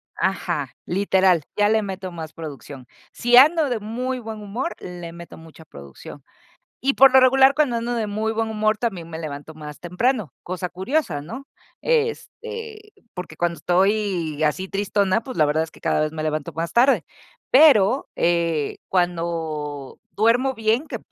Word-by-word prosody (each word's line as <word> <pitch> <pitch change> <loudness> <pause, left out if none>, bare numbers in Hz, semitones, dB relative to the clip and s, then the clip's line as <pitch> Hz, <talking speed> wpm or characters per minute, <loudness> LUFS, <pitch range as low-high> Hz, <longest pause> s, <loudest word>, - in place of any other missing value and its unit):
Ajá, - - -2
literal, 190 -3 +2
ya 205 0 +3
le 220 0 +3
meto 190 -1 -6
más 160 -2 -8
producción. 140 -5 -9 0.2
Si 240 +1 +3
ando 305 +1 +6
de 235 -3 -1
muy 250 +4 -3
buen 220 -2 -7
humor, 230 +11 -4
le 175 -2 -8
meto 170 0 -11
mucha 160 0 -14
producción 70 - -12 0.6
y, 275 +2 +2
por 270 0 +7
lo 265 - +8
regular, 265 +1 +5
cuando 285 -6 +1
ando 235 +1 -2
de 225 -2 -1
muy 215 +2 -2
buen 225 0 -1
humor, 215 0 +1
también 190 -9 -3
me 160 -1 -7
levanto 150 0 -7
más 150 -1 -10
temprano, 180 - -1
cosa 180 0 -4
curiosa, 190 - -2
¿no?, 245 - -9 0.3
este, 455 -2 -3 0.2
porque 180 -4 -7
cuando 170 -1 -1
estoy 180 -3 0
así 185 +5 -1
tristona, 200 +1 0
pues, 255 - -8
la 155 - +5
verdad 155 +2 +1
es 160 - -6
que - - -18
cada - - +1
vez 155 0 -1
me 155 -1 -4
levanto 155 +1 -3
más 165 +2 -4
tarde. 255 +4 +4 0.5
Pero, 260 -4 +5
eh, 170 -3 0
cuando 165 -6 -2
duermo 240 +5 +2
bien, 225 +6 0
que - - -5
195 Hz, 165 wpm, -22 LUFS, 165-240 Hz, 0.6 s, lo